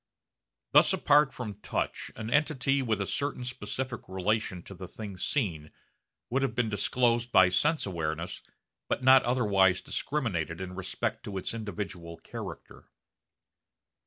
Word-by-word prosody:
Thus - - +6
apart 145 -1 +4
from 120 -4 -5
the 100 - -13
touch - - -3
an 110 +1 -5
entity 140 -2 +2
with 110 -5 0
a 100 - 0
certain 140 +3 -2
specific 125 0 -4
relation 95 -1 -1
to - - -10
the 95 0 -8
thing 100 +1 -8
seen 85 - -1 0.6
would 135 +3 +2
have 130 -5 -1
been 120 -2 +1
disclosed 120 +3 +1
by 95 -1 +7
sense 150 - +2
awareness 85 -2 -3 0.5
but - - -1
not 130 0 +8
otherwise 100 -7 +3
discriminated 95 - -2
in 95 -1 -5
respect 95 0 -3
to 100 -2 -5
its 95 - -3
individual 95 -6 -5
character. - - -9
110 Hz, 140 wpm, -29 LUFS, 95-125 Hz, 0.6 s, not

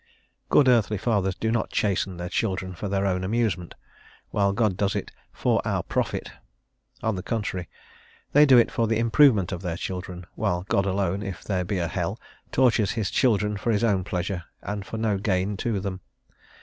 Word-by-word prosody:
Good 145 - +5
earthly 110 -4 +3
fathers 95 -3 0
do 110 +2 -1
not 115 -1 0
chasten 95 -2 0
their 90 0 -4
children 95 0 -2
for 100 +4 -5
their 100 0 0
own 90 -1 0
amusement, 95 -4 -1 0.6
while 100 -1 +2
God 105 -2 +1
does 100 +1 0
it - - -3 0.2
"for - - +1
our - - -1
profit;" - - -2 0.7
on 110 0 +1
the 95 - -4
contrary, 95 -4 -3 0.6
they 150 +1 +6
do 130 -2 +8
it 120 - +4
for 115 - +1
the 110 0 +1
improvement 115 - +4
of 90 -2 -4
their 85 -3 -3
children, 90 -1 -5
while 90 -4 -1
God 100 0 +1
alone, 95 0 0
if 95 -3 -6
there 95 -3 -1
be 95 +2 -2
a 85 -2 0
hell, 80 - -3 0.3
tortures 115 -6 +3
his 105 -3 -2
children 105 -5 +2
for 115 - 0
his 105 +1 +1
own 100 -5 +2
pleasure 90 0 -3 0.2
and 100 -1 -4
for 115 - -5
no 110 -3 0
gain 95 0 0
to 110 0 -1
them. 95 -1 -4
100 Hz, 190 wpm, -25 LUFS, 95-110 Hz, 0.7 s, do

